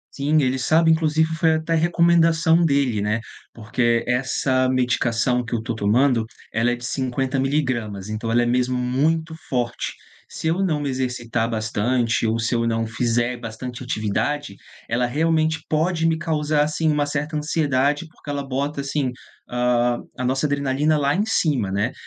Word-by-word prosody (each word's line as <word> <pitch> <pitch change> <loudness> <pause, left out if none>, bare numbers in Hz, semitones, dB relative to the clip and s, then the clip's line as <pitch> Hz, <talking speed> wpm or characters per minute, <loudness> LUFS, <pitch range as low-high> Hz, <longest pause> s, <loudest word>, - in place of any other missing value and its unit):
Sim, 150 +2 +2
ele 130 -1 +1
sabe, 160 +5 +3
inclusive, 160 0 +2
foi 160 0 +3
até 160 +1 -1
recomendação 165 0 +3
dele, 140 -8 +1
né? 105 +2 0 0.3
Porque 115 +1 0
essa 130 +1 +1
medicação 125 -1 +1
que 115 - -7
eu 115 - +1
estou 115 +1 -4
tomando, 115 +3 +2 0.3
ela 115 +2 +2
é - - 0
de 120 0 -9
50 130 +1 -1
miligramas, 120 -8 -1
então, 110 +1 -3
ela 120 +1 +3
é 120 - +1
mesmo 125 +1 +1
muito 155 +6 0
forte. 120 -2 -2 0.4
Se 160 - -5
eu 170 +4 +1
não 155 -6 0
me 145 - -2
exercitar 120 -3 -2
bastante 115 +2 0
ou 110 +1 +1
se 115 +2 -1
eu 115 0 +1
não 115 0 0
fizer 120 +2 0
bastante 120 +2 -7
atividade, 125 +3 -2 0.3
ela 125 +2 +1
realmente 160 +3 +1
pode 165 +2 +1
me 165 -1 +2
causar, 155 -2 +1
assim, 155 +1 0
uma 150 -1 +2
certa 150 +2 -3
ansiedade, 145 0 0
porque 150 - -14
ela 140 -1 -3
bota, 140 +2 -2
assim, 140 -2 -1 0.4
hã, 120 0 +1 0.2
a 125 - -2
nossa 135 +3 0
adrenalina 145 +2 +1
lá 140 0 +1
em 200 - +1
cima, 145 - +1
né. 100 +5 -1
130 Hz, 165 wpm, -22 LUFS, 120-155 Hz, 0.4 s, sabe